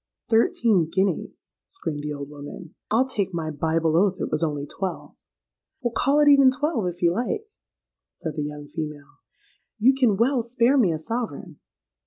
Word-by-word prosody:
'—'Thirteen 225 -6 +3
guineas!' 190 -2 -2 0.2
screamed 155 - -5
the 150 0 -4
old 140 -1 -5
woman: 150 +3 -10 0.2
'I'll 240 +5 +3
take 200 -8 -2
my 160 -2 -2
Bible 160 +1 0
oath 190 +2 +3
it - - -3
was 155 - 0
only 145 -3 -1
twelve.'—'Well, 195 - -7
call 285 +2 +3
it 295 - +4
even 275 -2 +7
twelve, 260 - -1
if 175 0 -5
you 170 - +5
like,' 250 - -2 0.6
said 160 -3 -6
the 155 - -2
young 150 0 -6
female: 145 -2 -7 0.6
'you 240 +5 +5
can 250 -7 +2
well 245 +3 +2
spare 240 +3 +2
me 195 -8 +4
a 160 - -1
sovereign.' 210 -3 -5
190 Hz, 165 wpm, -24 LUFS, 155-240 Hz, 0.6 s, even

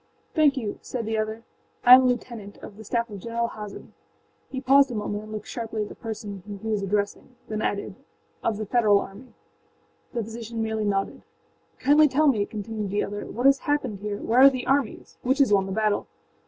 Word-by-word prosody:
âThank 300 -4 +4
you,â 220 -5 -4
said 240 -3 -4
the 220 +1 -1
other. 220 +1 -2 0.4
âI 245 - +10
am 255 - +10
a - - +1
lieutenant, 235 -4 -3
of 200 - -9
the 220 - -11
staff 235 +2 -1
of 200 - -7
General 235 +3 -2
Hazen.â 210 -2 -9 0.6
He 265 - -4
paused 275 +1 +5
a 245 - -5
moment 210 0 -3
and 215 - -11
looked 215 -1 -5
sharply 225 -2 -4
at 205 - -7
the - - -8
person 215 -4 -6
whom 205 -1 -6
he 220 +3 -6
was 210 -2 0
addressing, 205 +5 -2
then 215 0 -3
added, 200 -2 -2 0.5
âof 220 -2 0
the 215 - -3
Federal 210 -2 +4
army.â 210 +6 -9 0.8
The 235 -2 -1
physician 225 +1 -5
merely 220 -1 -1
nodded. 195 -1 -1 0.6
âKindly 295 +3 +5
tell 295 +4 +2
me,â 220 -8 +2
continued 215 -1 -4
the 205 +2 0
other, 205 +1 -5
âwhat 245 +3 -4
has 275 0 +6
happened 260 -9 -1
here. 205 0 -4
Where 230 +4 +1
are 275 - +10
the 255 -2 -4
armies? 270 -4 -1
Which 265 +2 +1
has 275 -7 +4
won 195 -1 +3
the - - -5
battle? 215 +1 0
220 Hz, 210 wpm, -25 LUFS, 205-250 Hz, 0.8 s, âI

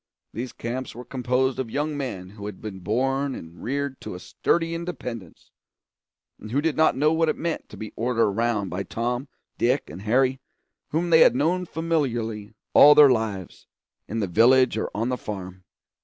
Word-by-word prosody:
These 120 +3 -5
camps 125 +3 -5
were 125 +1 -8
composed 125 +1 0
of 130 -3 -2
young 150 +5 -2
men 100 -10 -5
who 105 -1 -8
had 105 -3 -8
been 100 -3 -7
born 135 +8 0
and 80 +2 -11
reared 140 +1 -3
to - - -6
a - - -7
sturdy 165 - 0
independence, 125 - -7 0.9
and 110 - -9
who 130 +5 +1
did 160 0 0
not 155 -4 +3
know 150 +3 +3
what 160 0 +2
it - - -1
meant 170 -1 -3
to - - -11
be 110 - -7
ordered 115 0 +1
around 105 -1 0
by 90 +2 -3
Tom, 120 +7 -3 0.3
Dick, 125 +4 +1
and 95 - -9
Harry, 130 +5 +2 0.5
whom 170 +3 -1
they 160 - +7
had 125 - +6
known 170 +6 +1
familiarly 120 -11 -2 0.2
all 150 +1 +9
their 145 -3 +8
lives, 105 -6 -3 0.4
in 110 +1 -3
the - - +1
village 120 +7 +4
or 110 - -2
on 115 +4 -1
the 125 - -1
farm. 95 -3 -7
125 Hz, 185 wpm, -25 LUFS, 110-140 Hz, 0.9 s, all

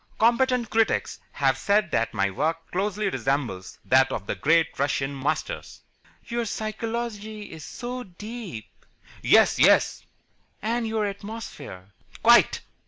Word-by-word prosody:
Competent 240 +1 +3
critics 225 -1 +1
have 135 -2 +1
said 205 0 +2
that 115 - +1
my 100 -3 +1
work 160 +9 -2
closely 205 +2 -1
resembles 130 - -2
that 130 +1 +4
of 100 - -4
the - - -2
great 160 0 +2
Russian 140 0 0
Masters." 145 - -3 0.5
"Your 235 0 -2
psychology 220 -1 -4
is 160 -2 -9
so 245 +8 -6
deep." 205 - -9 0.4
"Yes, - - +5
yes." - - +4 0.6
"And 230 +2 -1
your 220 -1 0
atmosphere." 200 - -7 0.3
"Quite." - - +6
200 Hz, 120 wpm, -25 LUFS, 140-225 Hz, 0.6 s, Quite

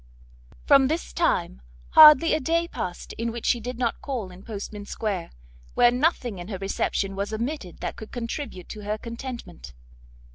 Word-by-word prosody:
From 275 -2 +6
this 320 +4 -3
time, 60 +1 0 0.3
hardly 310 +1 +9
a 310 - +2
day 335 +4 0
passed 180 - -6
in 230 0 -1
which 235 0 -7
she 240 - +2
did 245 +2 -6
not 240 -2 -1
call 240 -9 -4
in 180 +1 -13
Portman 205 -1 -7
square, 200 -7 -3 0.5
where 240 - +6
nothing 250 - 0
in 175 - -7
her 200 -3 -4
reception 195 0 -2
was 200 +2 -3
omitted 225 - -4
that - - -4
could 220 - -9
contribute 235 - -5
to 215 - -7
her 210 +1 -2
contentment. 230 - -8
230 Hz, 170 wpm, -25 LUFS, 200-260 Hz, 0.5 s, hardly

